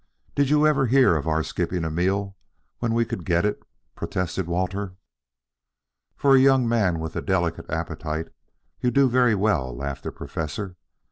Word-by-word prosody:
Did 140 -1 +2
you 150 +1 +4
ever 135 -4 +3
hear 125 -7 +5
of 80 0 -2
our 80 0 +1
skipping 90 +2 -2
a 80 - -2
meal 95 +4 -1 0.4
when 115 -1 0
we 115 0 +2
could 95 - -5
get 85 +2 +1
it?" 105 - -1 0.3
protested 90 0 -3
Walter. 90 +2 -2 1.2
"For 135 -1 +4
a - - +7
young 135 -2 +4
man 105 -7 +2
with 80 0 -5
a - - -1
delicate 85 -3 -1
appetite, 80 +1 -3 0.5
you 125 - +1
do 140 +1 +4
very 125 -2 +3
well," 80 - 0
laughed 70 0 -4
the - - -5
Professor. 90 +5 -5
95 Hz, 165 wpm, -24 LUFS, 80-120 Hz, 1.2 s, a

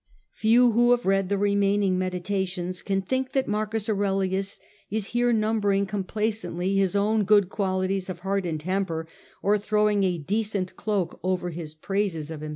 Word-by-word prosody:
Few 235 +2 +4
who 240 +2 +4
have 245 0 +3
read 195 -1 +2
the 200 - +1
remaining 200 -1 +2
Meditations 185 0 -2
can 195 -1 -1
think 260 +6 -2
that 270 -1 +1
M. 210 - -1
Aurelius 200 -3 -1 0.3
is 215 -1 -1
here 240 0 +2
numbering 215 -3 +1
com 195 -1 -3
placently 205 -3 -2
his 195 0 +2
own 210 +2 +2
good 205 -2 +4
qualities 190 -1 -1
of 175 -2 -6
heart 195 0 -1
and 160 -2 -2
temper, 165 -1 -2 0.4
or 205 +1 +3
throwing 210 -1 +2
a 180 -2 +1
decent 200 +3 -2
cloak 200 -4 -2
over 180 -1 -1
his 160 -2 -7
praises 165 -3 -2
of 155 -2 -6
himself. 155 - -5
195 Hz, 165 wpm, -26 LUFS, 185-210 Hz, 0.4 s, Few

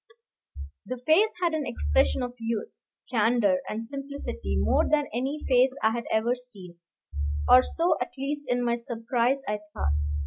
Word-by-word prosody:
The 255 - -5
face 380 +8 +5
had 340 -2 +2
an 310 -2 -1
expression 75 - +1
of 245 0 -4
youth, 225 -1 -4 0.3
candor, 220 -5 +3
and 225 +2 -4
simplicity 275 - -4
more 70 +4 +3
than 300 -1 +2
any 270 +6 -2
face 255 +1 +4
I 220 - +4
had 235 +1 -3
ever 220 +2 +2
seen, 200 -9 -11 0.7
or 255 - +8
so, 335 +6 +1
at 250 - -1
least 290 +2 -3
in 245 0 +1
my 235 0 +1
surprise, 240 +3 -1
I 210 0 -1 0.2
thought. 75 - 0
245 Hz, 160 wpm, -27 LUFS, 220-275 Hz, 0.7 s, or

